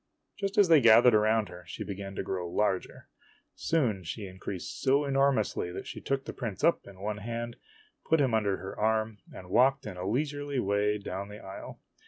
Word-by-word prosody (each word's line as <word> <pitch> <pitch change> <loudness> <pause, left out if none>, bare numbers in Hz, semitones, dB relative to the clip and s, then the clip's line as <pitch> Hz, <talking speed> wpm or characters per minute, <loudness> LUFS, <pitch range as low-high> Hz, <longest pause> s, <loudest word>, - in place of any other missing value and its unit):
Just 200 +1 -2
as 205 -2 +6
they 160 -4 +6
gathered 120 +1 +7
around 110 0 +3
her, 90 0 -11
she 80 - -6
began 100 0 -6
to - - -2
grow 90 -2 -3
larger. 95 0 -1 0.5
Soon 120 - 0
she 100 +6 -5
increased 95 -1 -7
so 140 +2 +3
enormously 135 -9 +1
that - - -6
she - - -7
took 135 -1 -2
the - - -6
prince 115 -7 -5
up 170 - +3
in 100 -2 -13
one 105 +1 -2
hand, 115 +2 -5 0.5
put 160 - +4
him 130 -5 +2
under 105 -3 +1
her 95 - -7
arm, 110 0 0
and 90 -1 -11
walked 135 +5 +4
in 90 - -6
a 90 +1 -4
leisurely 145 +2 -1
way 105 0 +1
down 100 -1 -5
the 105 - -9
aisle. 95 -2 -9
110 Hz, 195 wpm, -29 LUFS, 95-135 Hz, 0.5 s, gathered